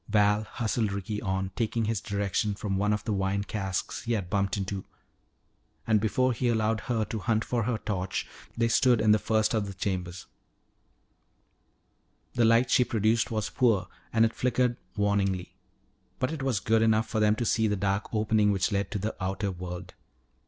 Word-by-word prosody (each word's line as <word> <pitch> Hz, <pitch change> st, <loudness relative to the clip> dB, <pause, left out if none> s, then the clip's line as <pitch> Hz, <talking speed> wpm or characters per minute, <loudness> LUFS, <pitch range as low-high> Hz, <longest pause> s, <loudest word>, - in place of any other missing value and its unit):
Val 105 Hz, 0 st, +3 dB
hustled 110 Hz, -2 st, -1 dB
Ricky 100 Hz, +2 st, -4 dB
on, 95 Hz, 0 st, -2 dB
taking 115 Hz, 0 st, 0 dB
his 110 Hz, -2 st, -1 dB
direction 100 Hz, 0 st, -1 dB
from 100 Hz, -1 st, -3 dB
one 105 Hz, +2 st, +1 dB
of 105 Hz, -1 st, -1 dB
the 110 Hz, -, -1 dB
wine 95 Hz, 0 st, 0 dB
casks 95 Hz, -3 st, -3 dB
he 120 Hz, -, -2 dB
had 100 Hz, -6 st, -3 dB
bumped 100 Hz, 0 st, 0 dB
into. 95 Hz, -1 st, -3 dB, 1.0 s
And 110 Hz, -2 st, +3 dB
before 130 Hz, +4 st, +2 dB
he 125 Hz, +2 st, -1 dB
allowed 110 Hz, -1 st, +1 dB
her 115 Hz, -1 st, -1 dB
to 110 Hz, +2 st, -4 dB
hunt 110 Hz, +2 st, 0 dB
for 120 Hz, -3 st, -1 dB
her 120 Hz, -1 st, 0 dB
torch 95 Hz, -3 st, -3 dB, 0.3 s
they 115 Hz, 0 st, +2 dB
stood 120 Hz, 0 st, +4 dB
in 110 Hz, -1 st, +4 dB
the 105 Hz, -, +5 dB
first 110 Hz, +1 st, +1 dB
of 105 Hz, -3 st, 0 dB
the 100 Hz, -, -7 dB
chambers. 90 Hz, -2 st, -3 dB, 2.1 s
The 120 Hz, -, +3 dB
light 115 Hz, +2 st, +4 dB
she 125 Hz, -, +5 dB
produced 115 Hz, 0 st, +1 dB
was 110 Hz, -2 st, -2 dB
poor 115 Hz, -8 st, +2 dB, 0.2 s
and 115 Hz, 0 st, +4 dB
it 115 Hz, -, -1 dB
flickered 125 Hz, 0 st, +1 dB, 0.2 s
warningly. 100 Hz, -3 st, 0 dB, 0.6 s
But 130 Hz, +3 st, -1 dB
it 155 Hz, -, -5 dB
was 130 Hz, -7 st, 0 dB
good 110 Hz, +4 st, +2 dB
enough 110 Hz, 0 st, +3 dB
for 110 Hz, -, -1 dB
them 105 Hz, 0 st, +4 dB
to 120 Hz, -, -2 dB
see 110 Hz, 0 st, +2 dB
the 105 Hz, -, +1 dB
dark 100 Hz, +1 st, -1 dB
opening 110 Hz, -1 st, +2 dB
which 95 Hz, -2 st, 0 dB
led 100 Hz, -1 st, 0 dB
to -, -, -3 dB
the 105 Hz, +3 st, -3 dB
outer 95 Hz, +2 st, -1 dB
world. 90 Hz, 0 st, -7 dB
105 Hz, 185 wpm, -28 LUFS, 100-115 Hz, 2.1 s, the